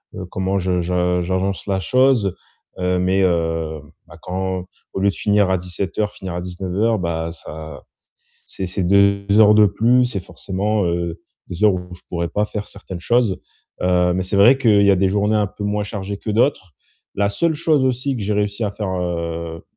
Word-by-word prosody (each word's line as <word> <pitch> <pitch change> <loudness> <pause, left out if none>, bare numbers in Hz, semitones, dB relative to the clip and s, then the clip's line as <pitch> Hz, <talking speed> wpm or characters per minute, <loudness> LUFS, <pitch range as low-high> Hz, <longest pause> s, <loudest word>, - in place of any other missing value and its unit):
heu, 95 - -6
comment 95 +1 -1
je 90 -1 0
je 90 0 0
j'avance 95 +2 -2
la 95 -2 0
chose. 125 -4 +2 0.4
Heu, 90 0 0
mais, 95 +2 +2
heu, 80 -3 0 0.3
bah, - - -14
quand 95 0 -3 0.3
au - - -4
lieu 100 +1 +3
de - - -2
finir 105 -2 +2
à 95 - +2
17:00, 95 +4 -3
finir 95 -3 -7
à 90 - -3
19:00, 95 +5 -1
bah, 85 -1 -2
ça 80 -2 -9 0.6
c'est 95 - -5
c'est 95 +2 -2
2 100 +2 +3
heures 105 -1 +7
de 105 0 +7
plus, 120 +6 +3
c'est 120 -5 -3
forcément, 100 +3 -2
heu, 85 0 -2 0.3
2 90 +3 -4
heures 105 -2 +6
où 90 -1 -6
je 90 - -12
pourrais 85 -1 -2
pas 105 - 0
faire 105 0 -5
certaines 95 -3 -9
choses. 120 -2 +1 0.4
Heu, 90 -1 +3
mais 95 +1 -1
c'est 95 +2 -3
vrai 120 +7 +7
qu'il 110 -6 +4
y 100 - +5
a 95 - +3
des 95 +1 +3
journées 105 +2 +1
un 105 -1 +1
peu 100 - -9
moins 105 0 -1
chargées 100 -1 -5
que 105 - -4
d'autres. 105 - +1 0.4
La 100 0 +2
seule 160 +11 0
chose 150 -4 +2
aussi 130 +2 0
que - - -5
j'ai 105 +2 -1
réussi 105 +2 -1
à 105 - -1
faire, 105 0 -4
heu, 85 -1 -4
95 Hz, 200 wpm, -20 LUFS, 90-105 Hz, 0.6 s, heures